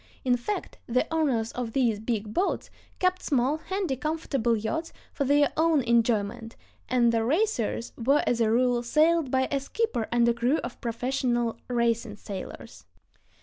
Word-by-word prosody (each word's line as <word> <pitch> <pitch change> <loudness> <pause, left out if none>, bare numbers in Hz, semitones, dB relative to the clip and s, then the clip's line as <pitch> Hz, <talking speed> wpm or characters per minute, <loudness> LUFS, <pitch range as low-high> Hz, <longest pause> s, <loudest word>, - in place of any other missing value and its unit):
In 250 -1 +4
fact, 245 +13 -4
the 250 +4 +1
owners 260 -9 +1
of 240 -3 -4
these 235 -6 +2
"big 215 -2 -3
boats" 370 - -1 0.3
kept 365 0 +1
small, 275 +1 +1
handy, 375 -3 -2
comfortable 275 -5 -1
yachts 270 +11 -3 0.2
for 280 - -1
their 290 +1 +3
own 320 -3 +3
enjoyment, 225 -1 +1 0.3
and 240 -2 +3
the 225 -1 +1
racers 265 - 0
were 280 +5 +3
as 235 -1 +1
a 220 - +3
rule 245 +1 +2
sailed 310 +4 +2
by 260 0 +1
a 280 - +1
skipper 280 - -2
and 235 0 +3
crew 245 +6 +2
of 240 - -7
professional 240 0 -1
racing 235 -2 0
sailors. 200 -1 -8
245 Hz, 150 wpm, -27 LUFS, 230-295 Hz, 0.3 s, In